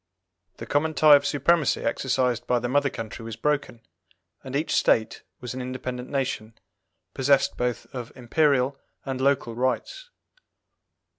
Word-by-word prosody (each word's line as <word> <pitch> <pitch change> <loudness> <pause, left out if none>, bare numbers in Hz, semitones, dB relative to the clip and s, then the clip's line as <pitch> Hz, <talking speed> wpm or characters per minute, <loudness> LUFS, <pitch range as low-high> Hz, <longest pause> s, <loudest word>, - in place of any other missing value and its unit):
The 115 - -7
common 150 +5 0
tie 155 -2 +8
of 145 0 +2
supremacy 160 +1 +2
exercised 125 -3 0
by 125 - +2
the 120 0 -2
mother 140 +3 +2
country 115 -1 -7
was 115 -1 -6
broken, 140 -4 -1 0.6
and 130 -1 -7
each 150 +3 -1
State 110 -1 +2 0.2
was 125 0 -6
an 130 - -5
independent 125 0 -5
nation, 125 -5 -3 0.6
possessed 140 +1 +2
both 125 -1 -2
of 125 -2 -6
Imperial 135 +1 +1 0.3
and 130 -1 -3
Local 135 -4 +1
rights. 130 - -2
130 Hz, 140 wpm, -25 LUFS, 125-145 Hz, 0.6 s, tie